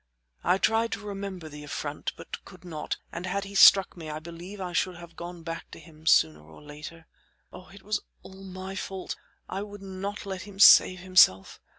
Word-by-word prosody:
I 180 +2 +3
tried 225 +3 +2
to 200 - -3
remember 195 -4 -6
the 150 -1 -10
affront, 145 0 -4
but - - -8
could 180 -1 -15
not, 155 -3 -4
and 175 +2 -5
had 195 +2 -1
he 200 0 -9
struck 195 0 +7
me 165 -3 -8
I 155 - -4
believe 170 +5 -9
I 180 -2 -5
should 180 +1 0
have 170 -1 -12
gone 170 0 -8
back 165 0 -6
to - - -11
him 160 -1 -15
sooner 80 - +4
or 80 +1 -15
later. 150 +2 -10 0.5
Oh! 180 0 -11
it 195 +1 -15
was 210 +1 -1 0.2
all 190 0 -12
my 190 0 -7
fault; 190 -1 -5 0.3
I 190 - -4
would 205 -1 -9
not 195 +2 -5
let 190 -1 -5
him 205 -1 -11
save 185 -3 +8
himself. 180 - +4
185 Hz, 200 wpm, -27 LUFS, 165-195 Hz, 0.5 s, save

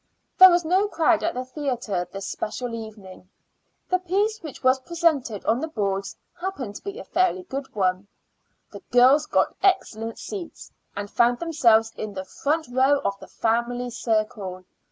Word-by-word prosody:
There 375 0 +12
was 350 -1 +2
no 375 +5 +2
crowd 330 -3 +2
at 335 - -1
the 255 +1 -3
theater 250 - -3
this 195 0 -6
special 240 +4 -4
evening. 210 -5 -9 0.6
The 365 - +1
piece 405 +5 0
which 310 -5 -9
was 260 +1 +4
presented 290 - 0
on 230 - +2
the 320 - -2
boards 200 -8 -3 0.2
happened 345 - -5
to - - -16
be 400 +2 -6
a - - -7
fairly 370 0 +1
good 275 -7 -6
one. 185 0 0 0.6
The 200 - -9
girls 260 +5 +5
got - - +1
excellent 230 - 0
seats, 380 -5 -8 0.2
and 205 0 -4
found 240 +1 +3
themselves 230 -9 +3
in 210 -2 -5
the 190 0 -5
front 310 - -2
row 265 +3 +3
of 200 0 -1
the - - -11
family 240 +2 -1
circle. 215 -5 -2
250 Hz, 165 wpm, -24 LUFS, 215-330 Hz, 0.6 s, There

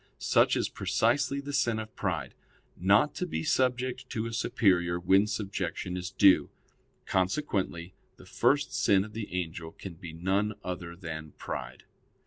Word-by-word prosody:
Such - - +3
is - - +1
precisely 120 +9 +1
the 145 +1 -6
sin 120 -4 +2
of 110 0 -6
pride - - -2 0.4
not 105 - +3
to 180 - -3
be 165 - -3
subject 130 -3 0
to 110 0 -2
a 115 - -5
superior 90 -7 +2
when 95 +4 +4
subjection 95 -4 -3
is 90 0 -4
due. 95 -7 +5 0.6
Consequently 95 - -1 0.2
the - - -15
first 140 0 +1
sin 95 -1 +3
of 105 - -12
the 110 -1 -5
angel 85 -2 -4
can 95 - -8
be 85 0 -9
none 95 +6 0
other 85 -2 -5
than 80 -4 -7
pride. 60 0 -6
95 Hz, 150 wpm, -29 LUFS, 85-115 Hz, 0.6 s, due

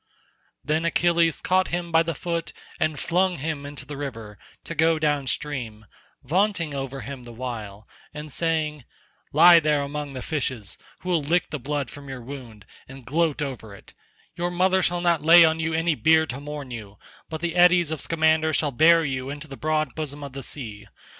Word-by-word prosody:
Then 155 +2 0
Achilles 170 -1 +2
caught 185 0 +2
him 175 0 -3
by 165 0 +5
the 165 -1 -2
foot 170 0 -3 0.3
and 155 -1 0
flung 180 +1 +1
him 145 0 -4
into 145 -1 -9
the 145 +2 -7
river 115 -8 -7 0.2
to - - -6
go 160 0 +3
down 145 -3 0
stream, 125 -7 -3 0.4
vaunting 175 +1 0
over 135 -1 -4
him 140 -2 -7
the 120 - -10
while, 110 -4 -7 0.2
and 150 0 -8
saying, 155 -2 -1 0.5
"Lie 170 +3 +8
there 150 -2 +1
among 145 0 -5
the 130 - -6
fishes, 130 -8 -3 0.2
who 185 - -6
will 170 -3 +2
lick 170 +5 0
the 150 - -3
blood 140 -1 -3
from 140 -1 -11
your 130 -2 -7
wound 120 -6 -10 0.2
and 135 -2 -12
gloat 155 +1 0
over 115 -7 -7
it; - - -17 0.4
your 175 +1 -1
mother 185 +2 +2
shall 175 -1 0
not 170 -3 +2
lay 165 +3 +8
you 165 - +8 0.2
on - - -1
any 165 +1 +2
bier 160 +1 +4
to 135 -3 -6
mourn 145 -2 -7
you, 105 -4 -8 0.3
but 160 -1 -5
the 170 0 -2
eddies 175 -2 +5
of 155 -3 -3
Scamander 160 0 +2
shall 145 -1 +1
bear 165 +5 +5
you 130 -1 -3
into 145 +2 -7
the 140 - -8
broad 155 -2 -1
bosom 145 -2 -5
of 140 -2 -8
the 135 - -6
sea. 110 -7 -6
150 Hz, 190 wpm, -24 LUFS, 135-165 Hz, 0.5 s, Lie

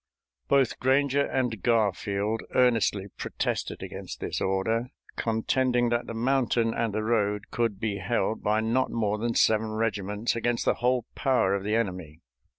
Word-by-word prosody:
Both 135 -4 +2
Granger 140 +2 +2
and 125 -6 -1
Garfield 105 -1 0
earnestly 115 -5 +2
protested - - -3
against - - -7
this - - -3
order, 110 +6 0 0.3
contending 120 +2 +1
that 120 0 -1
the 115 - -5
mountain 120 -2 +1
and 115 -2 -1
the 110 +1 -2
road 105 -2 0
could 115 -5 -1
be 100 -2 -2
held 110 +2 -1
by 105 +1 +1
not 115 +4 +1
more 105 -2 -1
than 115 +1 -1
seven 110 0 +3
regiments 105 0 -1
against 120 0 -1
the - - +4
whole 125 -1 +2
power 130 -8 +2
of 100 -1 -1
the 105 +2 0
enemy. 90 -8 -3
115 Hz, 155 wpm, -27 LUFS, 105-120 Hz, 0.3 s, the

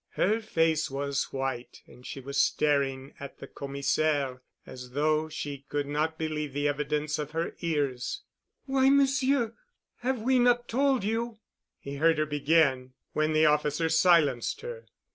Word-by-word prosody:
Her 215 +4 +2
face 165 -6 +1
was 140 0 -1
white 135 -2 -5
and 125 - -17
she 135 - -7
was 135 +1 0
staring 140 -2 0
at 140 - -9
the - - -9
Commissaire 140 -1 -1 0.2
as 125 -1 -10
though 155 +2 +1
she 145 -3 -6
could 145 -1 -1
not 155 +3 -1
believe 150 -3 -3
the 145 +1 0
evidence 150 +1 -1
of 150 0 -5
her 165 +1 -2
ears. 145 - -2 0.4
"Why, 270 -1 +3
Monsieur, 275 -3 +3 0.4
have 255 0 -1
we 255 +1 +3
not 245 0 +3
told 265 -1 +1
you——?" 225 +2 -2 0.4
he 140 0 -7
heard 165 +2 +3
her 155 - +1
begin, 145 -3 +2 0.2
when 155 0 +1
the 155 0 +4
officer 150 +2 +2
silenced 160 -7 +3
her. 475 0 -8
155 Hz, 150 wpm, -28 LUFS, 140-190 Hz, 0.4 s, the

